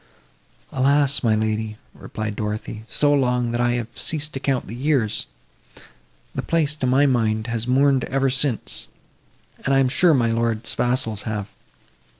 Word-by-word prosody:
"Alas! 140 +2 +3
my 110 -3 +2
lady," 110 0 -2 0.2
replied 110 -1 -5
Dorothée, 105 +1 -4
"so 145 -1 +2
long—that 125 -3 +1
I 120 0 +2
have 120 -1 -4
ceased 155 -1 -1
to 135 - -4
count 135 -2 -1
the 115 - -8
years! 125 -5 0 1.1
The - - -2
place, 160 -3 +1
to 130 - -1
my 135 +3 +4
mind, 110 -5 +1
has 115 0 -2
mourned 135 +1 +3
ever 135 0 0
since, 130 -3 -1 0.8
and 135 - +2
I - - +5
am 135 -1 +3
sure 160 +5 +4
my 115 -3 +2
lord's 115 -1 0
vassals 120 -4 0
have! 105 -2 -4
125 Hz, 155 wpm, -22 LUFS, 110-135 Hz, 1.1 s, I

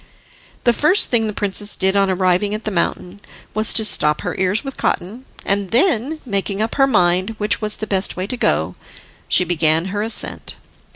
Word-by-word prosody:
The 240 - +3
first 305 - +3
thing 225 -3 +2
the - - -2
princess 205 0 -2
did 190 +1 0
on 195 -1 +2
arriving 185 +2 +1
at 215 - -7
the 215 - -3
mountain 180 +1 -3 0.3
was 215 +1 +1
to 220 - +4
stop 150 -7 +3
her - - -3
ears 190 +5 0
with 275 -2 -7
cotton, 225 +9 -3 0.2
and 195 -1 -1
then, 280 - +1
making 200 -3 -2
up 220 +1 -1
her 270 -1 +3
mind 185 -2 +1
which 210 +1 -1
was 210 -1 -1
the 215 - -5
best 195 -3 -1
way 185 - -2
to 230 - -4
go, 80 - 0 0.5
she - - +4
began 165 -1 +1
her 205 - -1
ascent. 225 +2 -1
205 Hz, 190 wpm, -19 LUFS, 185-225 Hz, 0.5 s, to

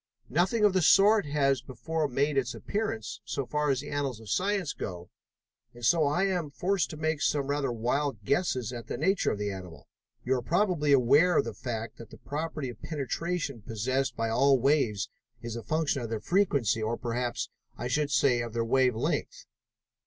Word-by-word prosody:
Nothing 185 - +2
of 205 - +4
the 185 - +3
sort 200 +3 +5
has 140 -3 +2
before 155 +5 -3
made 140 +3 0
its 125 -3 0
appearance, 205 - -3
so 140 - -3
far 150 +2 0
as 135 -1 +1
the 145 - -8
annals 140 -5 -2
of 110 -3 -8
science 195 -5 0
go, 90 -1 -7 0.6
and 120 -1 -6
so 160 +2 +4
I 150 +6 +1
am 180 -6 -1
forced 185 +6 0
to 155 - -7
make 155 -1 -1
some 145 -2 +1
rather 140 -2 -1
wild 120 0 -1
guesses 130 - 0
at 120 -2 -7
the - - -4
nature 190 +6 +2
of - - -2
the 105 0 -2
animal. 90 -3 -9 0.4
You 130 - +2
are - - -3
probably 170 - +1
aware 145 +7 +5
of - - +3
the - - -4
fact 115 -2 -5
that 115 - -11
the - - -12
property 150 -2 -4
of 115 -2 -10
penetration 155 -2 -3
possessed 125 +4 -1
by 115 0 -1
all 135 +4 +4
waves 120 -6 +2 0.4
is 115 -1 -5
a 115 - -4
function 155 +2 0
of 115 - -4
their 110 -1 -2
frequency, 140 - +1
or, 110 +2 -1
perhaps 120 0 -3 0.3
I - - -3
should 145 +4 0
say, 125 -2 +3
of 120 -2 -5
their 115 -1 0
wave 125 0 +3
length?" 330 - -2
140 Hz, 195 wpm, -29 LUFS, 120-160 Hz, 0.6 s, sort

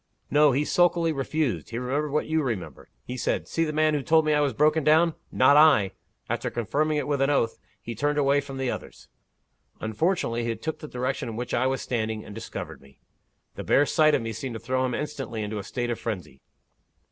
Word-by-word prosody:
"No. 150 0 +5
He 140 +4 +1
sulkily 170 -1 +3
refused 150 0 -2
he 115 - -5
remembered 135 +5 -1
what 150 +2 0
you 160 0 +1
remember. 115 - -5 0.2
He 125 - -5
said, - - -1
'See 165 - 0
the 155 - -2
man 155 0 +2
who 145 - 0
told 160 +3 +3
me 155 - +2
I 150 - +3
was 145 -2 +2
broken 150 +5 +2
down? 160 +3 +4 0.2
not 135 +3 +5
I!' 145 -11 +6 0.4
After - - -2
confirming 150 +7 0
it 145 - -2
with 145 -2 0
an 135 - +3
oath, 115 -6 +1 0.2
he 115 - -5
turned 145 +6 -1
away 140 0 +3
from 135 -1 -8
the 130 -2 -1
others. - - -9 0.7
Unfortunately, 120 - -1
he 115 0 -1
took 155 +8 -5
the 155 - -8
direction 125 -1 -3
in 110 - -6
which 120 +2 -4
I 125 +2 +2
was 130 0 -1
standing, 110 -3 -2
and 105 - -9
discovered 115 - -7
me. 70 0 -20 0.6
The - - -7
bare 145 - +4
sight 155 +1 +4
of - - -1
me 115 0 -4
seemed 115 +2 -5
to - - -5
throw 130 +3 -1
him 125 - -2
instantly 135 -7 -4
into 105 0 -4
a - - -6
state 120 +2 -3
of 115 - -3
frenzy. 90 - -5
135 Hz, 220 wpm, -26 LUFS, 115-150 Hz, 0.7 s, I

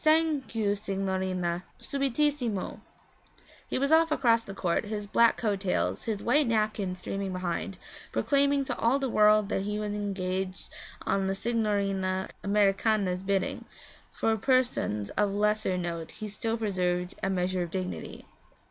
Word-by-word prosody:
'Sank 310 -5 +2
you, 210 -2 +2
signorina. 190 -3 -2 0.2
Subitissimo!' 275 -6 -1 0.9
He - - -1
was 275 +3 +1
off 325 0 +5
across 230 -6 +3
the 195 - -8
court, 180 +1 0
his 210 -1 -4
black 230 +3 +4
coat 210 -4 0
tails, 190 -2 -1
his 215 -3 -2
white 285 +3 +3
napkin 215 -4 0
streaming 195 +2 -4
behind, 185 +1 -3 0.3
proclaiming 280 -1 +2
to - - -2
all 235 +4 +3
the 275 -1 -1
world 210 -1 +5
that 195 - 0
he 210 +1 -2
was 210 -1 -2
engaged 190 -2 -3 0.4
on 195 -1 +1
the 195 - 0
Signorina 195 -4 0
Americana's 200 -2 +2
bidding; 195 0 -1 0.5
for 225 0 +1
persons 240 - +1
of 205 -1 0
lesser 210 -2 +1
note 170 -2 -3
he 215 0 -6
still 225 +2 -2
preserved 180 -4 -1
a 190 - 0
measure 185 -1 0
of 175 - -2
dignity. 185 +1 -5
205 Hz, 145 wpm, -29 LUFS, 185-230 Hz, 0.9 s, off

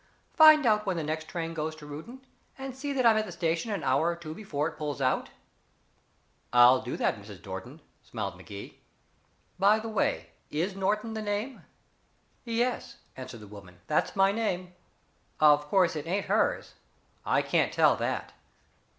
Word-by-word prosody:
Find 310 -3 +8
out 210 -2 +2
when 185 -2 0
the 165 - -2
next 155 +1 -3
train 165 -1 -4
goes 155 0 -3
to 155 -1 -12
Reuton, 225 - -9 0.3
and 265 -1 -6
see 285 +2 -4
that 260 -3 0
I'm 225 -2 +6
at 215 - 0
the - - -7
station 165 +5 -1
an 205 -2 -3
hour 135 +5 +2
or 170 - -1
two 165 -2 -8
before 160 -6 -3
it 160 - -7
pulls 150 -2 -4
out." 130 -1 0 1.2
"I'll 125 +1 +7
do 125 - -5
that, - - 0
Mrs. 100 -3 -12
Norton," 115 +11 -8 0.2
smiled - - -5
Magee. 100 0 -10 0.8
"By 205 +3 +5
the 225 +1 -5
way, 215 - -1 0.2
is 175 +6 -2
Norton 210 +3 -1
the 220 - -4
name?" 215 +5 -4 0.8
"Yes," 240 +2 -1 0.2
answered 130 -3 -9
the 105 - -11
woman, 100 -3 -13
"that's 150 - 0
my 195 0 +4
name. 185 -5 -2 0.7
Of 150 -1 +5
course, 180 0 +3
it 150 +1 -5
ain't 195 +4 -1
hers. - - 0 0.5
I - - +2
can't - - +1
tell - - +4
that." - - -3
170 Hz, 170 wpm, -28 LUFS, 145-215 Hz, 1.2 s, Find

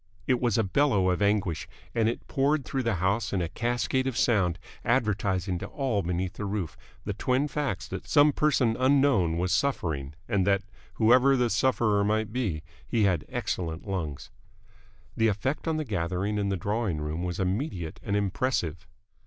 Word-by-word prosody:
It 125 -1 +1
was 120 -4 +2
a 115 - +3
bellow 100 -4 +2
of 90 - -1
anguish, 100 -5 +1 0.3
and 115 -1 +2
it 115 - -5
poured 140 0 +1
through 135 - -2
the 115 -4 0
house 100 +5 0
in 95 - +1
a 85 - -1
cascade 120 +6 -1
of 130 -3 -2
sound, 95 -7 +2 0.3
advertising 100 -6 0
to - - -5
all 130 -8 -1
beneath 90 +1 -2
the 105 - -5
roof 100 -5 -3 0.3
the - - -2
twin 130 +3 +1
facts 145 -2 -3
that - - -6
some 145 0 +5
person 130 -7 +2
unknown 130 -11 +3
was 90 +1 0
suffering 80 - -1
and 100 -4 +1
that 100 0 +3 0.3
whoever 125 +4 +5
the 120 -2 +1
sufferer 110 -3 +2
might 110 +1 0
be 100 -12 -2 0.2
he 115 -2 +1
had 90 -6 +2
excellent 85 +1 -3
lungs. 80 -8 -4 0.8
The 115 - +3
effect 130 - -1
on 160 -1 +1
the 155 - -2
gathering 100 0 -1
in 100 -1 0
the 95 - 0
drawing 100 -1 -1
room 75 +3 -3
was 90 -1 -3
immediate 95 - -2
and 100 - -2
impressive. 95 - -1
105 Hz, 175 wpm, -27 LUFS, 90-125 Hz, 0.8 s, some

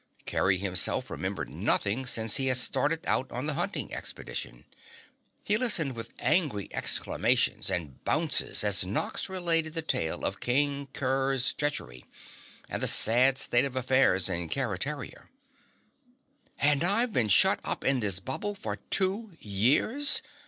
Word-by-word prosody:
Kerry 95 -1 +1
himself 95 -2 0
remembered - - -4
nothing 120 +6 -1
since 110 -3 -1
he 135 - +1
had 130 -1 +4
started 145 +5 +1
out 130 - 0
on 125 +3 -4
the 155 - +1
hunting - - -1
expedition. - - -6 0.8
He 210 - +2
listened 180 - +2
with 115 - -7
angry 150 - +1
exclamations - - +1
and 75 -7 -4
bounces 155 -6 0
as 100 -4 +2
Nox 95 - -2
related 165 -4 -1
the 165 - -1
tale 80 - -2
of - - -2
King 140 +2 0
Kerr's 135 -1 0
treachery 135 - -3 0.6
and - - -5
the - - +2
sad 125 +4 +4
state 120 -2 +2
of 135 -2 -4
affairs 130 -7 +2
in 85 -1 -3
Keretaria. 130 - -4 1.3
"And 145 +1 +2
I've 215 +6 +2
been 115 - +1
shut 95 - +5
up - - -2
in 135 -1 +2
this 100 -5 -1
bubble 205 - -4
for 105 - -5
two 195 +2 +1
years!" 135 - +1
135 Hz, 140 wpm, -28 LUFS, 105-155 Hz, 1.3 s, shut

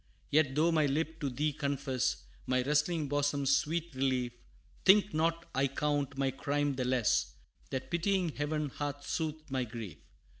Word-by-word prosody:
Yet, 145 -3 +3
though 160 +3 +4
my 155 -3 +3
lip 160 +3 -1
to 145 - -1
thee 145 +4 -1
confess, 135 -3 -1 0.2
My 130 -1 +2
wrestling 150 +3 +1
bosom's 140 -1 +2
sweet 170 +2 -1
relief, 130 -2 0 0.5
Think 205 +2 +6
not 165 +2 +1
I 135 +1 +2
count 140 0 -1
my 135 -1 +1
crime 145 +2 0
the 130 -1 -2
less, 125 -3 +1 0.3
That 130 -1 -4
pitying 180 +1 +1
Heaven 150 0 -2
hath 145 +1 -5
soothed 155 -2 -3
my 130 -1 0
grief. 115 -5 -7
145 Hz, 155 wpm, -32 LUFS, 135-155 Hz, 0.5 s, Think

